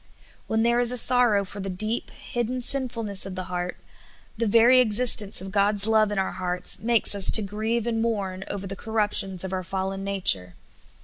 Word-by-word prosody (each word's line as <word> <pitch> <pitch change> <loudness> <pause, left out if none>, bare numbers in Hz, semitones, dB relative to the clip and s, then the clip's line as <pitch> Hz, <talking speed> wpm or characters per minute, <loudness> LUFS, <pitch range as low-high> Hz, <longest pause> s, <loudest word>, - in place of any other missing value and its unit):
When 220 0 -1
there 235 +1 +1
is 245 0 +4
a 250 - -1
sorrow 235 -5 +3
for 200 +2 -10
the 195 0 -6
deep, 215 +5 -1
hidden 245 +1 -6
sinful 250 -3 +2
ness 200 -2 -1
of 190 - -8
the 185 - -5
heart, 180 0 -5 0.6
the 230 0 -3
very 235 +4 +4
existence 215 -4 +3
of 190 0 -9
God's 200 0 +1
love 220 -1 +1
in 205 - -4
our 190 - -2
hearts 180 -1 -3
makes 230 -1 +2
us 200 -2 +5
to 220 - +4
grieve 215 +3 -3
and 225 -1 -2
mourn 195 -5 -4
over 200 -1 -7
the 195 0 -7
cor 220 +3 -11
ruptions 200 -4 +1
of 190 0 -6
our 185 - -3
fallen 190 +1 -5
nature. 180 - 0
205 Hz, 200 wpm, -23 LUFS, 190-230 Hz, 0.6 s, us